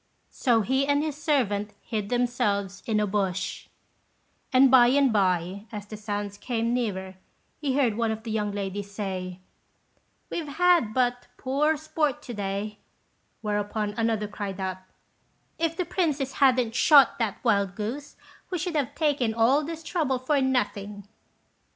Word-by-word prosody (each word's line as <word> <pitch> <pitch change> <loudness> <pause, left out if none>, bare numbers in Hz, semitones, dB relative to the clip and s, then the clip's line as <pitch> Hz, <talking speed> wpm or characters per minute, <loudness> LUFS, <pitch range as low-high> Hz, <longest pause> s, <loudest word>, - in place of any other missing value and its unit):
So 235 -3 +2
he 265 +6 +1
and 285 +1 +2
his 310 -3 -2
servant 225 -9 0
hid 210 -3 -4
themselves 205 -6 0
in 215 -2 +2
a 210 - +2
bush; 190 -2 -2 0.8
and 260 0 +6
by 250 -2 +8
and 270 -1 +3
by, 185 0 0
as 210 -2 -6
the 215 - -8
sounds 205 -1 -4
came 230 -1 -1
nearer, 190 -6 -2 0.4
he 275 -3 -1
heard 245 -7 +2
one 230 0 0
of 220 0 -3
the 225 - -5
young 210 -1 -1
ladies 200 0 -4
say, 185 -3 -5 0.9
"We've 325 -3 -3
had 335 -6 +3
but 245 -1 +1
poor 295 +4 +1
sport 300 -1 -1
to 245 - -7
day;" 205 +1 -4 0.6
whereupon 210 0 -1
another 225 -1 0
cried 200 -2 -5
out, 190 -1 -2 0.8
"If 330 0 0
the 365 - 0
princess 300 -8 -1
hadn't 250 -4 +4
shot 275 +1 +6
that 220 -4 -1
wild 200 -2 +2
goose, 250 +8 -5 0.3
we 365 - -2
should 350 0 -3
have 285 -5 -1
taken 280 -8 +1
all 250 +6 +4
this 325 +2 -6
trouble 300 -7 0
for 275 +3 +1
nothing." 210 -6 -1
230 Hz, 150 wpm, -26 LUFS, 205-275 Hz, 0.9 s, by